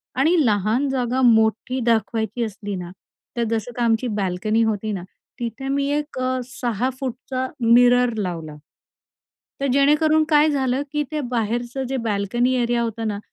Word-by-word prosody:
आणि 300 +7 +3
लहान 215 +5 +1
जागा 255 -1 0
मोठी 225 +1 +3
दाखवायची 225 0 0
असली 205 -2 -5
ना, 175 -1 -6 0.5
तर 235 - +1
जसं 225 +1 -2
तर - - -2
आमची 230 +2 +2
बाल्कनी 195 +5 0
होती 215 -1 -1
ना, 185 -3 -4 0.4
तिथे 240 +3 -4
मी 280 0 0
एक 295 -3 -5 0.3
6' 255 +2 -3
मिरर 245 +1 +5
लावला. 170 -6 -4 1.1
तर 275 - +1
जेणेकरून 300 +3 +4
काय 300 0 +5
झालं, 265 -2 0
की 295 0 0
ते 305 - -2
बाहेरचं 240 +3 -2
जे 270 - -1
बाल्कनी 220 +5 0
एरिया 240 0 +1
होतं 225 -1 -3
ना, 205 -1 -3
240 Hz, 145 wpm, -22 LUFS, 220-260 Hz, 1.1 s, मिरर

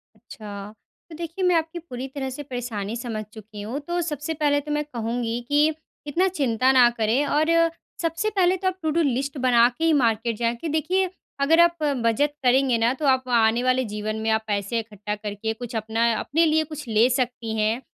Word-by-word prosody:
अच्छा। 210 -2 -9 0.4
तो 325 - -9
देखिए, 335 +3 -5
मैं 360 -1 +4
आपकी 325 +1 -1
पूरी 265 -6 -7
तरह 265 -2 -3
से 265 +3 -6
परेशानी 235 -5 -4
समझ 230 -2 -4
चुकी 215 -1 -10
हूँ, 230 +7 -4
तो 345 +4 -2
सबसे 310 -1 -3
पहले 295 -2 +1
तो 295 +1 -7
मैं 295 0 0
कहूँगी 235 -2 -3
कि, 295 +2 +3 0.3
इतना 345 +6 +2
चिंता 260 -8 +1
ना 250 -2 +6
करें 230 +6 +2
और 305 +3 +1 0.5
सबसे 330 +5 0
पहले 375 -3 +2
तो 375 - -2
आप 370 0 -1
टू 315 - +1
डू - - +4
लिस्ट 275 0 -1
बना 245 -2 +5
के 325 - -3
ही 325 - +4
मार्केट 230 -4 +1
जाएँ। 235 +1 0
कि 320 +8 -5
देखिए, 360 +5 +1 0.3
अगर 310 +4 +4
आप 340 0 +5 0.3
बचत 285 +6 +2
करेंगे 255 -1 +3
ना, 230 +2 +2
तो 290 +3 -4
आप 260 -1 +2
आने 230 0 +3
वाले 255 0 +2
जीवन 210 0 -4
में 220 - -1
आप 220 0 +1
पैसे 205 +2 -1
इकट्ठा 210 -2 -5
करके 210 +1 -4
कुछ 240 +1 -8
अपना 225 +1 +1
अपने 330 +3 +2
लिए 315 0 +3
कुछ 305 -2 -8
ले 225 +1 +4
सकती 245 -3 -1
हैं। 220 +3 +1
255 Hz, 205 wpm, -24 LUFS, 225-305 Hz, 0.5 s, ना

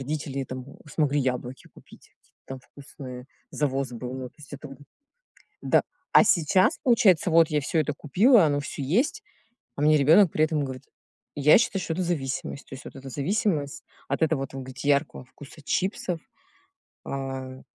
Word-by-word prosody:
родители 140 -1 -4
там 130 0 -7 0.2
смогли 145 -1 +1
яблоки 125 -1 -3
купить, - - -17
какие-то - - -37
там 135 -1 -8
вкусные, 130 -3 -11 0.2
завоз 135 -3 -1
был. 125 +2 -6
Ну, 130 -1 -6
то - - -41
есть 150 -1 -14
это 145 0 -10 0.9
да, - - +3 0.3
а - - +7
сейчас, 185 - +3
получается, 200 - +4
вот 165 -1 +5
я 150 -1 +1
всё 155 +3 0
это 150 0 -1
купила, 195 - +4
оно 145 -1 0
всё 140 - -6
есть, 240 - 0 0.5
а 140 - -5
мне 155 0 +5
ребенок 160 +6 +5
при 155 - +1
этом 155 -2 -1
говорит 130 -1 -7 0.5
Я 145 +1 +6
считаю 195 -4 0
что 165 - -3
это 185 - -2
зависимость. 140 -4 -3
То - - -9
есть 135 - -12
вот - - -10
это 135 0 -9
зависимость, 150 0 -1 0.3
от - - -2
этого, 155 -3 +1
вот 135 - -6
вы 135 - -5
говорите, 130 +2 -5
яркого 140 -2 +1
вкуса 145 +4 -14
чипсов, 180 0 -1 0.9
а 135 -1 -5
145 Hz, 170 wpm, -26 LUFS, 135-165 Hz, 0.9 s, а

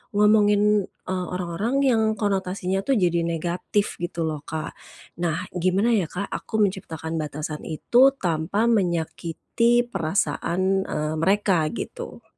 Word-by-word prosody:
ngomongin, 210 -1 +4
eee, 185 -1 -5
orang-orang 180 +7 -2
yang 235 -5 +3 0.2
konotasinya 190 -2 -1
tuh, 275 - +2
jadi 175 -3 +2
negatif 175 +5 -2
gitu 170 -1 -2
loh, 155 -2 -3
Kak. 155 -1 -4 0.5
Nah, 170 0 -1
gimana 185 +6 +2
ya, 185 -6 +1
Kak, 195 +5 -4
aku 220 - -5
menciptakan 165 -5 -3
batasan 150 0 -4
itu 245 - +4
tanpa 175 +1 -1
menyakiti 190 +5 +1
perasaan, 190 0 0
eee, 150 +1 -2
mereka 190 -3 +2
gitu? 480 - -7
185 Hz, 120 wpm, -24 LUFS, 165-210 Hz, 0.5 s, ngomongin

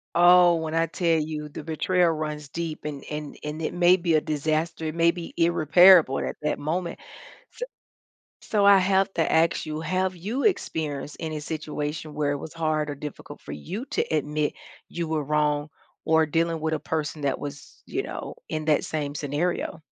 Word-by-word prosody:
Oh, 175 0 +7
when 160 -1 -3
I 165 0 +2
tell 165 -3 +1
you 150 -1 -4
the 150 - -8
betrayal 170 +2 +2
runs 150 -2 -4
deep 165 -1 -5
and 145 -2 -5
and 150 -1 -6
and 150 +2 -4
it - - -2
may 175 +1 +5
be 170 -3 +1
a - - +5
disaster, 155 +2 -1
it 155 - -3
may 170 0 +4
be 170 -1 -8
irreparable 170 -2 +6
at - - -3
that 150 - -1
moment. 170 +3 -3 0.5
S - - -15 0.8
so, 205 -2 +1
I 200 -1 +8
have 190 0 +2
to 165 - +1
ask 165 +1 +2
you, 155 0 -4
have 185 +3 -1
you 220 +11 -3
experienced 150 - -1
any 155 -2 -3
situation 150 0 -4
where 145 -1 0
it 145 - -1
was 155 - -8
hard, 155 -2 -1
or 145 - -4
difficult, 145 +1 -8
for - - -9
you 190 - -6
to - - +1
admit 150 -1 0 0.4
you 170 -1 -3
were 155 -2 -1
wrong, 150 0 0 0.3
or 160 0 +4
dealing 165 +1 0
with 160 0 -1
a 155 - -1
person 155 -2 -3
that 140 -2 0
was, 145 -1 -9
you - - -2
know, - - -6
in 155 -1 -3
that 155 -2 +3
same 145 -2 -3
scenario? 155 +3 -2
155 Hz, 185 wpm, -25 LUFS, 150-170 Hz, 0.8 s, I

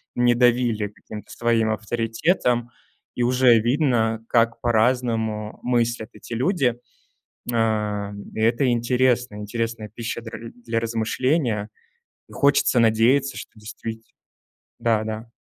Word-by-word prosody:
не 120 0 +3
давили 120 -3 +2
каким-то 105 +1 -11
своим 115 -2 +1
авторитетом, 120 - 0 0.5
и 120 - 0
уже 125 -2 +5
видно, 115 -3 +1
как 115 -1 +2
по-разному 110 -2 0
мыслят 120 -2 0
эти - - -10
люди. 130 - +1 0.8
А, 105 -3 0 0.2
и - - -6
это 115 +4 +2
интересно, 125 -1 +1
интересная 110 +1 -4
пища 115 +2 -5
дря 115 0 -8 0.2
для 115 0 0
размышления, 115 0 0 0.6
и - - -16
хочется 140 -3 +3
надеяться, 120 +5 +3
что - - -8
действит 110 +1 -7 0.8
Да-да. 110 0 -1
115 Hz, 110 wpm, -23 LUFS, 110-125 Hz, 0.8 s, уже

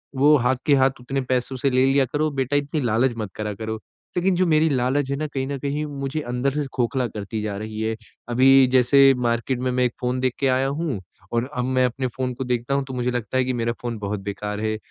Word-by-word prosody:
वो 145 +3 +5
हाथ 125 +1 +2
के 145 - +5
हाथ 135 -1 +4
उतने 135 +2 -2
पैसों 130 0 -1
से 135 +2 +1
ले 130 0 +3
लिया 135 0 +3
करो 155 +1 +1
बेटा 135 +3 -1
इतनी 145 +1 0
लालच 120 +2 +2
मत 105 -4 -5
करा 105 -1 -3
करो।" 110 +2 -5 0.4
लेकिन 180 +1 +2
जो 185 - +2
मेरी 155 0 +4
लालच 135 +1 +1
है - - +1
ना 155 - -2
कहीं 135 -2 -3
न 140 - -3
कहीं 145 +2 -2
मुझे 140 +3 -2
अंदर 125 +3 0
से 145 +1 -2
खोखला 125 +1 0
करती 105 0 -5
जा 105 -2 -3
रही 110 +1 -5
है। 110 0 -1 0.3
अभी 130 +2 +6
जैसे 135 +2 +6
मार्केट 120 +1 0
में 125 0 -1
मैं 125 0 +1
एक 120 - -1
फ़ोन 125 +1 -1
देख 130 -1 0
के 135 - +2
आया 130 +1 +2
हूँ 140 - -2 0.3
और 120 +3 0
अब 125 - +1
मैं 130 0 +2
अपने 130 +1 -1
फ़ोन 130 -1 -1
को 130 +2 -4
देखता 125 +1 -1
हूँ 140 - +1
तो 130 - -8
मुझे 125 0 -1
लगता 120 +1 -2
है 130 - +2
कि 130 - -1
मेरा 115 -1 -1
फ़ोन 120 -2 -3
बहुत 100 0 -3
बेकार 105 +1 -4
है। 110 0 -1
130 Hz, 250 wpm, -23 LUFS, 120-135 Hz, 0.4 s, अभी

